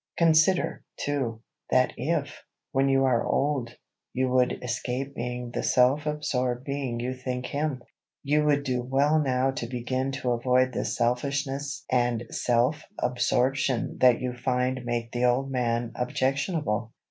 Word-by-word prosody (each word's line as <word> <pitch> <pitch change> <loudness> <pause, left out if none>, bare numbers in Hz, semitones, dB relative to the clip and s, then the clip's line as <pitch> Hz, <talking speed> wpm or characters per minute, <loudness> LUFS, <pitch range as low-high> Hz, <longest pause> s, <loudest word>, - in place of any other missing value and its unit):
Consider, 165 +2 +3
too, 125 -6 -2 0.3
that 130 0 +3
if, 150 -1 -2 0.3
when 135 -1 +2
you 135 0 +3
are 120 -3 +2
old, 135 -4 0 0.4
you 130 0 +1
would 125 0 +1
escape 125 +2 -3
being 125 0 -4
the - - -2
self 135 +5 +3
absorbed 130 -5 -1
being 135 -4 -3
you 125 +2 -2
think 125 0 -4
him, 145 -3 -2 0.4
you 150 +1 +2
would 145 -1 +2
do 125 -3 -1
well 140 +5 +2
now 130 -1 +1
to 130 -4 -4
begin 130 +2 -2
to 130 -2 -1
avoid 125 +1 +2
the - - -2
selfishness 140 +3 -1
and 120 -2 +1
self 125 +5 +1 0.2
absorption 125 +1 0
that 125 -2 +5
you 125 -1 -3
find 125 0 -1
make 120 -1 -2
the 120 0 0
old 130 +2 +1
man 120 -2 0
objectionable. 130 - -1
130 Hz, 145 wpm, -27 LUFS, 125-140 Hz, 0.4 s, that